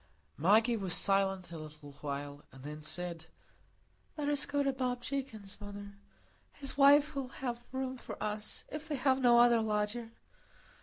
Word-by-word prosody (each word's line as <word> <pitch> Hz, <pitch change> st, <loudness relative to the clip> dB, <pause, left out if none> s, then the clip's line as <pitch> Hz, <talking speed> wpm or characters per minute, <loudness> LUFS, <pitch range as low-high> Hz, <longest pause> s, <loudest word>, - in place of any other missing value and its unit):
Maggie 220 Hz, +8 st, +4 dB
was 190 Hz, -5 st, -1 dB
silent 195 Hz, -2 st, +2 dB
a 165 Hz, -, -6 dB
little 150 Hz, -1 st, -10 dB
while, 145 Hz, 0 st, -5 dB
and 135 Hz, -1 st, -14 dB
then 150 Hz, +1 st, -7 dB
said,— 165 Hz, +1 st, -4 dB, 0.9 s
"Let 290 Hz, -1 st, -1 dB
us 290 Hz, -2 st, +3 dB
go 285 Hz, 0 st, 0 dB
to 275 Hz, -1 st, +1 dB
Bob 250 Hz, -2 st, -2 dB
Jakin's, 220 Hz, -8 st, -5 dB
mother; 205 Hz, 0 st, -8 dB, 0.6 s
his 275 Hz, -1 st, -3 dB
wife 285 Hz, +1 st, +6 dB
will 275 Hz, -2 st, -3 dB
have 240 Hz, -2 st, -5 dB
room 260 Hz, 0 st, -3 dB
for -, -, -8 dB
us, 210 Hz, 0 st, -2 dB
if 305 Hz, +1 st, -6 dB
they 305 Hz, -, -2 dB
have 265 Hz, 0 st, +2 dB
no 240 Hz, -1 st, +6 dB
other 240 Hz, -1 st, +6 dB
lodger." 215 Hz, +2 st, -1 dB
220 Hz, 160 wpm, -33 LUFS, 180-260 Hz, 0.9 s, wife